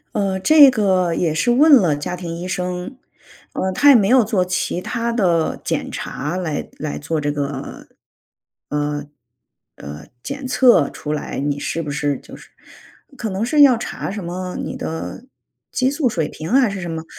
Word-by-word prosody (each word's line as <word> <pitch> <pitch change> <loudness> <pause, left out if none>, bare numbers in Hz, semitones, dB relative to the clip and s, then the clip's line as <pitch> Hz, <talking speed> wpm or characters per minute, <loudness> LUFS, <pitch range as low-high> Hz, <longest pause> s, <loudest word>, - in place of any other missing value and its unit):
呃， 195 -2 0
这 285 +6 +7
个 190 -6 +1
也 165 -2 0
是 240 +10 +1
问 295 +6 +5
了 175 - +3
家 145 +5 -4
庭 175 -2 -6
医 175 +2 -6
生， 180 +6 -4 0.6
呃， 190 - -1
他 290 +10 +4
也 280 - +9
没 205 -4 +4
有 250 +1 +5
做 200 -4 +1
其 180 -1 -2
它 235 +2 -2
的 175 -8 +1
检 - - -2
查 150 +6 -4
来 160 -5 -3
来 150 -1 -4
做 160 +1 -2
这 145 0 -1
个， 140 -2 -5 0.8
呃 145 0 -2 0.7
呃， 75 +1 -9 0.2
检 275 -1 -5
测 245 - +4
出 150 - -6
来 150 - -4
你 145 +1 -2
是 165 +3 -3
不 150 - -5
是 145 -1 -1
就 - - -13
是 - - -15 0.7
可 225 - -3
能 195 +3 -2
是 295 +4 +3
要 260 -4 +7
查 - - -5
什 200 -1 -5
么 180 +1 -5
你 - - -5
的 160 +9 -6 0.5
激 260 0 +1
素 285 -3 0
水 165 -8 -1
平 160 - -7
啊 260 - +4
还 245 - +2
是 195 -1 -5
什 175 - -5
么。 160 -1 -4
180 Hz, 200 characters per minute, -20 LUFS, 155-235 Hz, 0.8 s, 也